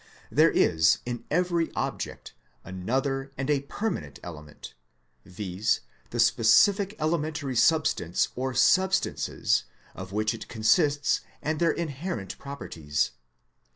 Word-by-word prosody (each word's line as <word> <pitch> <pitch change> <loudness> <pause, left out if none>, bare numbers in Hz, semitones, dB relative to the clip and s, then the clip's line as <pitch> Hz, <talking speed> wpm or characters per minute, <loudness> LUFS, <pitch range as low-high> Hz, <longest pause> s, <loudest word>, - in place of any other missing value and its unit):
There - - +5
is 80 +1 +3
in 120 -1 -5
every 170 0 +1
object - - -4 0.3
another 135 +9 -2
and 135 +2 -1
a 140 -2 +2
perma 210 - -3
nent 70 -2 -12
element, 75 -3 -10 0.5
viz., 95 +2 -1 0.3
the - - -5
specific 195 - +4
elementary 155 -4 -1
substance 135 - +2
or 130 0 -3
substances 190 +1 +2 0.3
of 95 0 -8
which 105 +1 0
it - - -8
consists 145 +6 +2 0.2
and 155 0 -2
their 170 - +3
inherent 155 - -4
properties. 80 - -3
135 Hz, 115 wpm, -27 LUFS, 100-160 Hz, 0.5 s, There